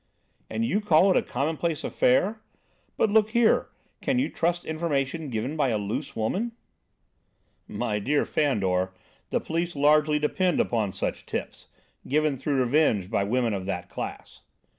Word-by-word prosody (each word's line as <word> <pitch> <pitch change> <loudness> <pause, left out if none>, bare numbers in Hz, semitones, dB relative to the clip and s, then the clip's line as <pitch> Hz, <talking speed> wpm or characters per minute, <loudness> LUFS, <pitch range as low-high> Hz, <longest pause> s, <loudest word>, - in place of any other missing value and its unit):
"And 230 - -1
you 215 -2 +1
call 190 -1 +5
it - - +3
a - - +4
commonplace 155 +2 -2
affair? 200 - +2 0.6
But, 215 - +2
look 215 0 +4
here, 235 -1 +3 0.3
can 270 -2 0
you 260 - +1
trust 175 +1 -1
information 155 -1 -2
given 125 +5 -3
by 145 -4 +1
a 110 - +1
loose 110 +8 -4
woman?" 195 - -1 1.1
"My 105 - -2
dear 145 +8 +1
Fandor, 95 -10 0 0.4
the - - +1
police 170 +1 -2
largely 150 +1 +4
depend 175 +5 +1
upon 110 -5 +1
such - - -4
tips, - - -5 0.4
given 150 +1 +2
through 135 0 0
revenge 120 - +2
by 100 - +1
women 115 +2 0
of 95 -2 -3
that 90 -2 -4
class." - - -7
150 Hz, 150 wpm, -26 LUFS, 115-170 Hz, 1.1 s, call